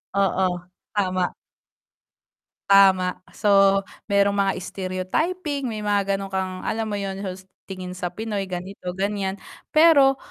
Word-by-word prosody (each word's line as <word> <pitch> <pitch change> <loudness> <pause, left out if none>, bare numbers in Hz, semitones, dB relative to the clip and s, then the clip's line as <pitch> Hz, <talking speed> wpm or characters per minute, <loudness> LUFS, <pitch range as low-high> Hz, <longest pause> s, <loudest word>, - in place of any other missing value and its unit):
Oo, 190 -1 +2 0.5
tama. 185 -2 0 1.4
Tama. 190 -2 +5 0.2
So 195 -1 +4 0.2
merong 200 0 +3
mga 195 -1 +2
stereotyping 260 - -2
may 215 -2 -5
mga 200 -1 +1
gano'n 195 0 -6
kang, 190 -1 -2
alam 220 0 -2
mo 205 - -2
yun 195 -1 -4
hust 190 -1 -6 0.2
tingin 185 -1 -6
sa 180 - -2
Pinoy 210 -1 -3
ganito, 180 0 -6
ganyan. 195 0 -1 0.4
Pero 295 -4 +6
195 Hz, 120 wpm, -23 LUFS, 185-210 Hz, 1.4 s, Pero